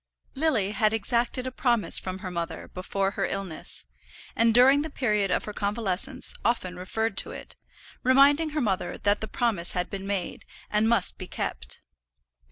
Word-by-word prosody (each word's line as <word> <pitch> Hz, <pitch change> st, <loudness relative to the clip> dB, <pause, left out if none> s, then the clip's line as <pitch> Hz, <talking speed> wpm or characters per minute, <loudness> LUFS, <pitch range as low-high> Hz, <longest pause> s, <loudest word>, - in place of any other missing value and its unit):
Lily 265 Hz, -10 st, +1 dB
had 215 Hz, 0 st, +2 dB
exacted 235 Hz, +3 st, +1 dB
a 255 Hz, -, -3 dB
promise 240 Hz, -4 st, +2 dB
from 185 Hz, 0 st, -5 dB
her 185 Hz, -, -4 dB
mother 170 Hz, -1 st, -4 dB
before 195 Hz, +1 st, -2 dB
her -, -, -1 dB
illness, 195 Hz, -5 st, -5 dB, 0.5 s
and 230 Hz, 0 st, +4 dB
during 260 Hz, +5 st, +6 dB
the 315 Hz, -, -4 dB
period 210 Hz, -8 st, 0 dB
of -, -, +1 dB
her 210 Hz, -, -6 dB
convalescence 215 Hz, +5 st, -1 dB
often 185 Hz, -6 st, 0 dB
referred 215 Hz, +4 st, -2 dB
to -, -, +2 dB
it, 480 Hz, -, -9 dB, 0.5 s
reminding 280 Hz, +5 st, +5 dB
her 305 Hz, 0 st, -2 dB
mother 190 Hz, -6 st, -1 dB
that 205 Hz, 0 st, +1 dB
that 220 Hz, -, -3 dB
promise 205 Hz, -8 st, +1 dB
had 180 Hz, -1 st, -2 dB
been 195 Hz, 0 st, -5 dB
made, 200 Hz, -3 st, -3 dB, 0.3 s
and 215 Hz, +1 st, +3 dB
must 230 Hz, -6 st, +3 dB
be 185 Hz, -, -6 dB
kept. -, -, -4 dB
215 Hz, 170 wpm, -27 LUFS, 190-250 Hz, 0.5 s, during